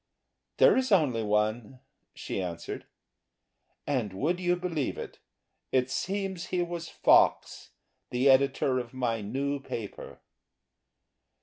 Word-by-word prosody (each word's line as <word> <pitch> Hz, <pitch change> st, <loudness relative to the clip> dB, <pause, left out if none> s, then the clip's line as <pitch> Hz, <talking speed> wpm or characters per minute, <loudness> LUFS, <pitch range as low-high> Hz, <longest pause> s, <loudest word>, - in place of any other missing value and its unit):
"There -, -, +6 dB
is 260 Hz, -2 st, 0 dB
only 145 Hz, -, +3 dB
one," 110 Hz, +3 st, -1 dB, 0.4 s
she -, -, -4 dB
answered. 85 Hz, -2 st, -6 dB, 1.0 s
And 125 Hz, -9 st, -1 dB
would 160 Hz, -, -1 dB
you 180 Hz, -1 st, +1 dB
believe 175 Hz, -6 st, -3 dB
it! -, -, -8 dB, 0.5 s
it 130 Hz, 0 st, +1 dB
seems 190 Hz, +2 st, -3 dB
he 180 Hz, -1 st, 0 dB
was 170 Hz, -1 st, -5 dB
Fox, -, -, +3 dB, 0.4 s
the 125 Hz, +3 st, +1 dB
editor 135 Hz, -1 st, +3 dB
of 120 Hz, +1 st, -8 dB
my 120 Hz, -3 st, -1 dB
new 140 Hz, +7 st, -2 dB
paper. 115 Hz, -6 st, -7 dB
135 Hz, 115 wpm, -28 LUFS, 115-175 Hz, 1.0 s, There